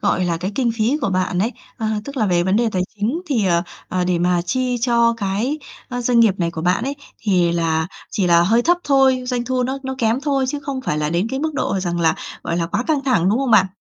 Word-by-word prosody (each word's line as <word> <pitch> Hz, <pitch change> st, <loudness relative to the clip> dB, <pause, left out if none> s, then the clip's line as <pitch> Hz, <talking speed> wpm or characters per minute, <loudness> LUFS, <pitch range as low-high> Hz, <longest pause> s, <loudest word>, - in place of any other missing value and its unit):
gọi 190 Hz, -3 st, +1 dB
là, 170 Hz, -1 st, 0 dB
cái 185 Hz, +4 st, -4 dB
kinh 245 Hz, -1 st, +1 dB
phí 230 Hz, +5 st, +1 dB
của -, -, 0 dB
bạn 185 Hz, -1 st, 0 dB
ấy, 225 Hz, +6 st, 0 dB, 0.2 s
ờ, 225 Hz, -, -3 dB, 0.2 s
tức 280 Hz, 0 st, -8 dB
là 220 Hz, -, +1 dB
về 175 Hz, -2 st, +2 dB
vấn 190 Hz, +3 st, +1 dB
đề 235 Hz, 0 st, +2 dB
tài 185 Hz, -1 st, +1 dB
chính 225 Hz, -, -1 dB
thì, 235 Hz, -, +1 dB
ờ, 170 Hz, -1 st, +2 dB, 0.3 s
ờ, 180 Hz, -1 st, -1 dB
để 180 Hz, -1 st, +1 dB
mà 175 Hz, 0 st, +2 dB
chi 255 Hz, +5 st, -1 dB
cho 235 Hz, -1 st, +3 dB
cái, 215 Hz, +8 st, -1 dB, 0.3 s
ơ, 245 Hz, -1 st, -3 dB
doanh 240 Hz, -1 st, +3 dB
nghiệp 215 Hz, -5 st, +5 dB
này 170 Hz, -1 st, 0 dB
của 160 Hz, -1 st, -6 dB
bạn 180 Hz, +6 st, +1 dB
ấy, 280 Hz, +1 st, -2 dB, 0.2 s
thì 180 Hz, -5 st, +2 dB
là 160 Hz, -1 st, 0 dB, 0.2 s
chỉ 195 Hz, -, 0 dB
là 170 Hz, -1 st, +5 dB
hơi 225 Hz, +6 st, +3 dB
thấp 350 Hz, +5 st, +3 dB
thôi, 270 Hz, -2 st, +3 dB
doanh 245 Hz, -1 st, -1 dB
thu 255 Hz, 0 st, 0 dB
nó 265 Hz, +2 st, -2 dB
nó 265 Hz, 0 st, -4 dB
kém 230 Hz, +3 st, +1 dB
thôi 280 Hz, -2 st, 0 dB
chứ 290 Hz, +1 st, -3 dB
không 275 Hz, -2 st, -4 dB
phải 150 Hz, -12 st, -2 dB
là 150 Hz, 0 st, -1 dB
đến 175 Hz, +4 st, 0 dB
cái 265 Hz, -, -2 dB
mức 315 Hz, 0 st, -2 dB
độ 195 Hz, -8 st, -1 dB
rằng 175 Hz, -1 st, -2 dB
là, 160 Hz, -1 st, +3 dB, 0.3 s
gọi 170 Hz, -, -2 dB
là, 170 Hz, -1 st, 0 dB
quá 205 Hz, +6 st, -1 dB
căng 295 Hz, -4 st, 0 dB
thẳng, 240 Hz, -10 st, +2 dB
đúng 220 Hz, +5 st, +2 dB
không 270 Hz, -2 st, -1 dB
bạn? 200 Hz, -4 st, +6 dB
220 Hz, 270 wpm, -20 LUFS, 180-260 Hz, 0.3 s, bạn